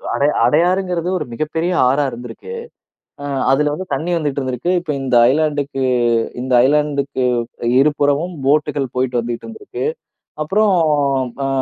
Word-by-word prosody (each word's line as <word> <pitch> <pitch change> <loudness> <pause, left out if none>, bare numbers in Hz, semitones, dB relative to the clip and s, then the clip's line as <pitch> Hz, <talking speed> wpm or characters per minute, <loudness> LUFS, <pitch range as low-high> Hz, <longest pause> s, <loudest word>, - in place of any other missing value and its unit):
அடை 140 - +2 0.2
அடையாறுங்கிறது 180 +2 +1
ஒரு 150 - -4
மிகப்பெரிய 160 +7 -2 0.2
ஆறா 140 +3 +2
இருந்திருக்கு. 120 - -9 0.7
அ - - -5 0.3
அதில 150 +2 +2
வந்து 185 +5 -5
தண்ணி 155 +6 -2
வந்துட்டிருந்திருக்கு. 140 -1 -2
இப்போ 170 -3 -4
இந்த 130 -2 0 0.2
ஐலேண்ட்க்கு 145 -3 -1 0.6
இந்த 130 0 -2
ஐலேண்ட்க்கு 140 -1 0 0.6
இருபுறமும் 145 +4 +1
போட்டுகள் 145 0 +1
போயிட்டு 125 -1 0
வந்துட்டிருந்திருக்கு. 120 - -5 0.6
அப்புறம் 205 +5 +2 0.7
அ - - 0
145 Hz, 115 wpm, -18 LUFS, 135-165 Hz, 0.7 s, அடை